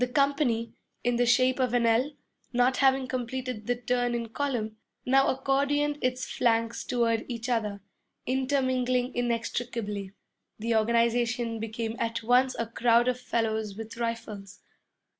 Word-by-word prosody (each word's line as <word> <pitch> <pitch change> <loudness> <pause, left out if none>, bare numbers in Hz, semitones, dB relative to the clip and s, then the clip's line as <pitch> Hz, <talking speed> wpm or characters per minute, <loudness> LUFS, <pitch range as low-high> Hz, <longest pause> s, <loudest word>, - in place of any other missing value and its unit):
The - - +2
company, 250 -3 +1 0.3
in 245 0 +1
the 245 0 +2
shape 255 +2 +3
of 250 -2 +1
an 240 -1 +3
L, 235 +6 +2 0.4
not 245 +1 +2
having 270 -1 +3
completed 255 -3 -4
the 245 - +2
turn 245 0 0
in 230 -1 -3
column, 230 -4 -2 0.3
now 270 +2 +4
accordioned 285 +2 +1
its 255 0 0
flanks 230 -1 0
toward 230 -2 +1
each 235 -1 -5
other, 210 -4 -1 0.4
intermingling 255 -1 +1
inextricably. 230 -4 -2 0.4
The 230 +2 -1
organization 235 +1 +1
became 225 +1 -3
at 230 0 -2
once 250 +3 +3
a 230 - -1
crowd 235 +1 +3
of 250 0 -1
fellows 220 -4 -1
with 220 +1 -7
rifles. 225 -4 -5
240 Hz, 140 wpm, -28 LUFS, 230-255 Hz, 0.4 s, now